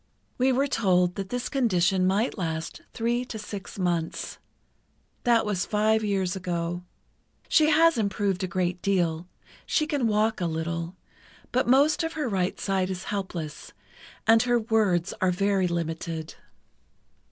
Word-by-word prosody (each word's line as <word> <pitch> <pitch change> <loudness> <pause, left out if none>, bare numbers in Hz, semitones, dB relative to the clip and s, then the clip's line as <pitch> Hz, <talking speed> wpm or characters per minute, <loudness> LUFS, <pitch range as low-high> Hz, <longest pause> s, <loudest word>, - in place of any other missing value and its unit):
We 260 +1 +4
were 265 +2 +2
told 185 -9 +2
that 195 +1 -5
this 245 0 -2
condition 190 -7 +2
might 205 +6 +1
last 165 -4 -4
three 240 +1 0
to 230 - -6
six 205 -3 -7
months. 175 -3 -2 0.9
That 235 -2 +4
was 200 -4 0
five 220 +1 +2
years 195 -3 0
ago. 175 -1 -3 0.7
She 310 -1 +4
has 325 -2 +5
improved 200 -2 0
a - - 0
great 180 0 -1
deal; 175 -4 0 0.4
she 305 - +2
can 290 -6 0
walk 215 -1 +1
a 175 - +1
little, 165 +2 -3 0.6
but 255 0 +1
most 285 +6 +4
of 325 +1 -2
her 305 -4 -2
right 190 -4 -1
side 190 -2 0
is 185 -1 -4
helpless, 175 -6 -5 0.5
and 225 0 +6
her 245 0 +2
words 210 -6 +1
are 185 - +3
very 195 +1 +1
limited. 165 -1 -3
195 Hz, 145 wpm, -26 LUFS, 175-230 Hz, 0.9 s, and